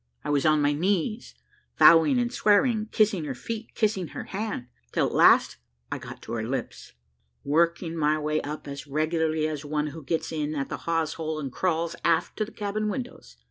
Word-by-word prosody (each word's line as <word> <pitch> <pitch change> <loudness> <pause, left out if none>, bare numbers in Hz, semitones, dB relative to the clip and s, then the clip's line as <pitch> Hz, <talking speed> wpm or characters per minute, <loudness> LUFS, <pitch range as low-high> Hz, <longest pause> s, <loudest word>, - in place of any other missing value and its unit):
I - - -2
was 145 +1 +2
on 155 -1 +4
my 145 0 +3
knees, 195 +7 -1 0.4
vowing 165 - +7
and 240 -1 0
swearing, 215 +1 +3
kissing 210 -7 +1
her 135 -3 -4
feet, 225 - -6
and - - -32
kissing 205 -6 0
her - - -7
hand, 205 - -4 0.3
till - - +1
at - - -3
last - - +5 0.3
I - - -3
got - - -10
to - - -9
her 115 -2 -2
lips, 130 +4 -5 0.5
working 165 +3 +1
my 155 -1 +2
way 155 0 -1
up 150 +1 -6
as 140 +1 -7
regularly 155 +1 0
as 155 -2 -4
one 150 0 -1
who 160 - -8
gets 160 +4 -2
in 155 -1 -2
at 140 -2 -3
the - - -4
hawsehole 160 -1 -1
and 140 -3 -4
crawls 170 +1 -1
aft 165 -1 +1
to 215 - 0
the 220 - -13
cabin 210 0 -2
windows. 250 +2 -7
160 Hz, 195 wpm, -26 LUFS, 150-205 Hz, 0.5 s, vowing